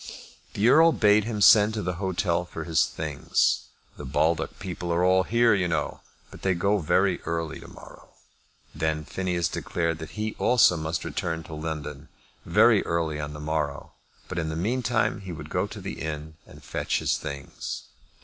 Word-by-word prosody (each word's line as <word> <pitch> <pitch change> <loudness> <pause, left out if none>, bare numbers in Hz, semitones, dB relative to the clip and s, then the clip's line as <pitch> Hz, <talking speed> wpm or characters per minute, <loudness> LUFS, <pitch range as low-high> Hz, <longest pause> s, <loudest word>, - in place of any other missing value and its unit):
The 105 +3 +2
Earl 165 +5 +6
bade 105 -1 +4
him 110 -3 -3
send 105 +1 +7
to 105 - -2
the 90 -1 -3
hotel 90 -2 0
for 85 -2 -7
his 80 -3 +2
things. 75 -3 0 0.3
"The - - -8
Baldock 80 +5 0
people 90 -2 -5
are 85 +2 +2
all 95 0 +5
here, 115 +4 +3
you 95 -3 +1
know, 80 -2 -2 0.3
but - - -12
they 95 -1 +1
go 100 +4 +1
very 95 +3 +2
early 80 -1 -3
to - - -12
morrow." - - -14 0.6
Then 80 0 -1
Phineas 90 +2 -1
declared 85 -2 -2
that 80 +6 -9
he 110 0 -2
also 120 -7 +5
must 80 0 -3
return 80 -1 -3
to 80 - -10
London 75 -1 -5 0.4
very - - +5
early 80 -3 -1
on 75 0 -5
the 75 - -8
morrow; 75 -2 -3 0.4
but 90 - -3
in 80 -1 -2
the 80 - -3
meantime 110 +3 0
he 95 -2 -7
would 75 -3 -8
go - - 0
to - - -9
the - - -6
inn 80 0 -5
and - - -15
fetch - - -1
his - - 0
things. 70 -3 -6
85 Hz, 180 wpm, -26 LUFS, 80-100 Hz, 0.6 s, send